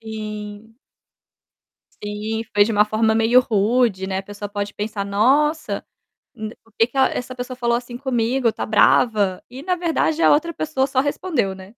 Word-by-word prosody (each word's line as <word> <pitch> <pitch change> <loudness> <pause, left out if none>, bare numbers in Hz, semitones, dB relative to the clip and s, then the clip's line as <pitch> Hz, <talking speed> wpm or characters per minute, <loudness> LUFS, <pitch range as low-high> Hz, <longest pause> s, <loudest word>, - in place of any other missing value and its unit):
Sim. 215 0 -8 1.3
Sim, 210 +2 -3
foi 205 0 +6
de 225 - -2
uma 210 0 +4
forma 220 +1 +1
meio 225 +3 +5
rude, 220 -3 +1
né, 190 0 -2
a - - -4
pessoa 205 +1 -8
pode 205 0 -4
pensar: 210 -1 -3
"Nossa, 270 +10 +1 0.5
d 220 0 -7
por 225 - -27
que 225 - +4
que 250 - -9
essa 255 -1 +1
pessoa 250 +1 -6
falou 235 -1 +1
assim 240 0 -8
comigo, 245 -1 0
tá - - -4
brava?". 210 -3 +3
E 260 +3 -9
na 365 +2 0
verdade 330 -2 0
a - - +6
outra 330 +3 +2
pessoa 295 -4 -1
só 265 -1 0
respondeu, 280 - -1
né? 190 - -11
225 Hz, 175 wpm, -21 LUFS, 210-260 Hz, 1.3 s, foi